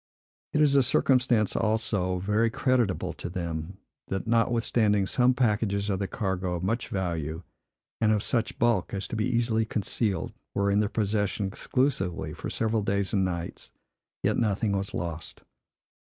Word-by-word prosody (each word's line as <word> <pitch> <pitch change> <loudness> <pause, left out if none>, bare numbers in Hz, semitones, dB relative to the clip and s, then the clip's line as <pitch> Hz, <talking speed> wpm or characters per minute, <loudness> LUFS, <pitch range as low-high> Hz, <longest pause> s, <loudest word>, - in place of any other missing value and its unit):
It 150 - +3
is 145 -2 +4
a 140 - +6
circumstance, 125 -4 +2
also, 105 -4 0
very 105 +5 +1
creditable 120 -4 0
to - - -6
them, 85 -1 -4 0.3
that 95 - -3
notwithstanding 115 -3 +2
some 125 +5 +3
packages 105 -4 +1
of 95 - -1
the 100 - -1
cargo, 95 -3 -2
of 85 - -4
much 115 +5 -1
value, 85 -3 -3 0.6
and 110 -1 +3
of 105 -2 +1
such 115 -2 0
bulk 115 -6 +1
as 95 - -3
to - - -4
be 110 +1 0
easily 115 -2 +1
concealed, 105 -1 -1 0.2
were 100 0 +2
in 100 - +3
their 105 -1 +1
possession, 105 -2 0
exclusively, 95 -3 -1
for - - -6
several 110 -1 0
days 100 -1 -1
and 100 -2 +3
nights, 85 -2 -4 0.5
yet - - +2
nothing 105 -2 +1
was 100 0 -2
lost. 85 -1 -5
105 Hz, 155 wpm, -27 LUFS, 95-115 Hz, 0.6 s, a